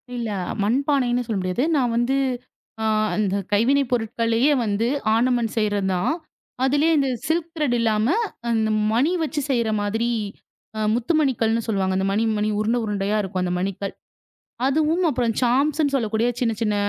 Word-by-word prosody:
இல்ல 235 Hz, -2 st, -3 dB, 0.3 s
மண் 225 Hz, +6 st, +2 dB
பானைன்னு 250 Hz, -4 st, +1 dB
சொல்ல 215 Hz, -3 st, -1 dB
முடியாது. 185 Hz, +7 st, -1 dB
நான் 245 Hz, -4 st, +1 dB
வந்து 240 Hz, +3 st, +1 dB, 0.7 s
அ -, -, -1 dB, 0.3 s
அந்தக் 200 Hz, -2 st, -1 dB
கைவினை 265 Hz, +7 st, +3 dB
பொருட்களையே 230 Hz, +3 st, +1 dB
வந்து 210 Hz, +2 st, 0 dB, 0.3 s
ஆர்ணமன்ட் 235 Hz, -1 st, +1 dB
செய்றது 205 Hz, -2 st, 0 dB
தான். 180 Hz, +11 st, 0 dB, 0.5 s
அதுலயே 290 Hz, +5 st, +3 dB
இந்த 275 Hz, -2 st, +2 dB, 0.2 s
சில்க் 330 Hz, +1 st, 0 dB
திரட் 295 Hz, -6 st, 0 dB
இல்லாம, 220 Hz, -1 st, +1 dB, 0.5 s
இந்த 220 Hz, 0 st, +1 dB, 0.2 s
மணி 265 Hz, +9 st, +2 dB
வச்சு 305 Hz, -1 st, -2 dB
செய்ற 235 Hz, -3 st, +1 dB
மாதிரி 225 Hz, +3 st, -1 dB, 0.7 s
அ -, -, -2 dB, 0.2 s
முத்துமணிகள்ன்னு 240 Hz, -4 st, +1 dB
சொல்லுவாங்க. 190 Hz, -3 st, 0 dB, 0.2 s
மணி 210 Hz, +3 st, +1 dB
மணி 210 Hz, +1 st, 0 dB
உருண்டை 225 Hz, +3 st, +1 dB
உருண்டையா 205 Hz, 0 st, -1 dB
இருக்கும் 180 Hz, -2 st, -2 dB
மணிகள். 195 Hz, +1 st, -3 dB, 0.7 s
அதுவும் 315 Hz, +5 st, +1 dB
அப்புறம் 240 Hz, -4 st, 0 dB
சாம்ஸ்ன்னு 280 Hz, +4 st, +2 dB
சொல்லக்கூடிய 225 Hz, -2 st, 0 dB
சின்ன 235 Hz, -2 st, +1 dB
சின்ன 210 Hz, -2 st, +1 dB
230 Hz, 140 wpm, -23 LUFS, 210-270 Hz, 0.7 s, கைவினை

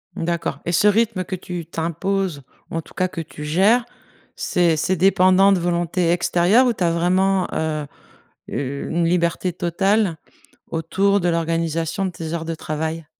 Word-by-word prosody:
D'accord 170 Hz, -2 st, -2 dB
et 170 Hz, -, -1 dB
ce 205 Hz, +4 st, +3 dB
rythme 210 Hz, -2 st, +2 dB
que 185 Hz, -, -4 dB
tu 175 Hz, -2 st, -6 dB
t'imposes, 170 Hz, 0 st, -2 dB, 0.3 s
en 165 Hz, -, -3 dB
tout -, -, -18 dB
cas, 185 Hz, -, 0 dB
que 170 Hz, -, -6 dB
tu 150 Hz, -1 st, -9 dB
gères, 195 Hz, +11 st, +3 dB, 0.5 s
c'est 170 Hz, -3 st, +1 dB
c'est 185 Hz, +5 st, +1 dB
dépendant 185 Hz, +1 st, +5 dB
de 195 Hz, -, +3 dB
volonté 175 Hz, 0 st, 0 dB
extérieure 180 Hz, +8 st, +3 dB
où 240 Hz, -, +2 dB
tu 190 Hz, -, -3 dB
as 170 Hz, -, +2 dB
vraiment 185 Hz, +2 st, +2 dB
heu, 155 Hz, -2 st, -2 dB, 0.6 s
u 140 Hz, 0 st, -4 dB
une 170 Hz, 0 st, +1 dB
liberté 170 Hz, +1 st, 0 dB
totale 185 Hz, +1 st, +1 dB, 0.5 s
autour 195 Hz, +5 st, +1 dB
de 175 Hz, -, +1 dB
l'organisation 165 Hz, +2 st, -1 dB
de 185 Hz, -, -2 dB
tes 165 Hz, -1 st, -6 dB
heures 165 Hz, -1 st, -3 dB
de 165 Hz, -, -3 dB
travail? 160 Hz, +1 st, -4 dB
175 Hz, 165 wpm, -21 LUFS, 165-190 Hz, 0.6 s, dépendant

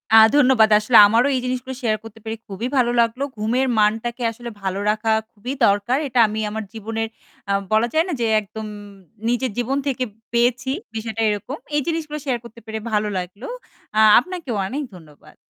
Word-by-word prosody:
আ -, -, +10 dB, 0.2 s
ধন্যবাদ। 255 Hz, -6 st, +5 dB
আসলে 225 Hz, +2 st, +4 dB
আমারও 235 Hz, +5 st, +3 dB
এই -, -, +1 dB
জিনিসগুলো 255 Hz, +1 st, -3 dB
শেয়ার 215 Hz, -2 st, +1 dB
করতে 225 Hz, 0 st, -12 dB
পেরে 220 Hz, 0 st, -4 dB
খুবই 205 Hz, +5 st, -4 dB
ভালো 240 Hz, -1 st, +3 dB
লাগলো। 230 Hz, +4 st, 0 dB
ঘুমের 240 Hz, +5 st, +1 dB
মানটাকে 225 Hz, +3 st, +1 dB
আসলে 235 Hz, +1 st, -8 dB
ভালো 190 Hz, 0 st, -2 dB
রাখা 220 Hz, +1 st, 0 dB, 0.2 s
খুবই 240 Hz, +6 st, -6 dB
দরকার। 205 Hz, +6 st, +2 dB
এটা 250 Hz, -1 st, 0 dB
আমি 215 Hz, +1 st, -4 dB
আমার 220 Hz, +1 st, -4 dB
জীবনের 225 Hz, +1 st, -3 dB, 0.4 s
আ -, -, +3 dB, 0.2 s
বলা 220 Hz, +2 st, +3 dB
যায় 320 Hz, +2 st, +3 dB
না 350 Hz, -, -2 dB
যে -, -, +2 dB, 0.2 s
একদম 215 Hz, +2 st, -8 dB, 0.6 s
নিজের 245 Hz, -1 st, 0 dB
জীবন 255 Hz, +3 st, 0 dB
থেকে 260 Hz, -2 st, -1 dB, 0.3 s
পেয়েছি। 245 Hz, +2 st, +1 dB, 0.2 s
বিষয়টা 220 Hz, 0 st, -3 dB
এরকম। 225 Hz, +8 st, -3 dB, 0.2 s
এই 295 Hz, -, +3 dB
জিনিসগুলো 310 Hz, -2 st, -2 dB
শেয়ার 250 Hz, -3 st, 0 dB
করতে 235 Hz, 0 st, -12 dB
পেরে 220 Hz, 0 st, -5 dB
ভালো 210 Hz, 0 st, +1 dB
লাগলো। 185 Hz, +6 st, -6 dB, 0.5 s
আ -, -, +5 dB, 0.2 s
আপনাকেও 340 Hz, -, -5 dB
অনেক 285 Hz, +6 st, -3 dB
ধন্যবাদ। 155 Hz, -4 st, -17 dB
230 Hz, 180 wpm, -21 LUFS, 215-255 Hz, 0.6 s, আ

